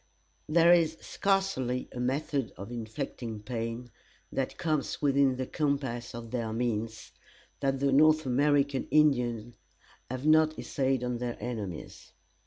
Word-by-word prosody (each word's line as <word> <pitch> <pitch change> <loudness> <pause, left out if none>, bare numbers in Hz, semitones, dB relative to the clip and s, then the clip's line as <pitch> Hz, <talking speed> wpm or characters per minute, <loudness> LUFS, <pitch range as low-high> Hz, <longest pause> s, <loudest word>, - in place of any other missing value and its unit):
There 170 +2 +6
is 165 -2 +3
scarcely 190 -11 0
a 125 - -7
method 135 0 -1
of 100 +4 -8
inflicting 115 -2 -5
pain, 115 +1 -4 0.4
that 135 -1 -2
comes 155 -4 -1
within 140 -2 +3
the 130 0 -3
compass 135 -6 -2
of 115 -1 -8
their 115 -3 -2
means, 115 -1 -2 0.5
that 135 -1 0
the 140 0 +2
North 155 +2 +5
American 140 +1 +2
Indians 120 -6 +2 0.6
have 130 +2 -4
not 155 0 +4
essayed 135 -3 -1
on 125 -1 -2
their 120 -1 -3
enemies. 105 -9 -6
130 Hz, 130 wpm, -29 LUFS, 120-145 Hz, 0.6 s, There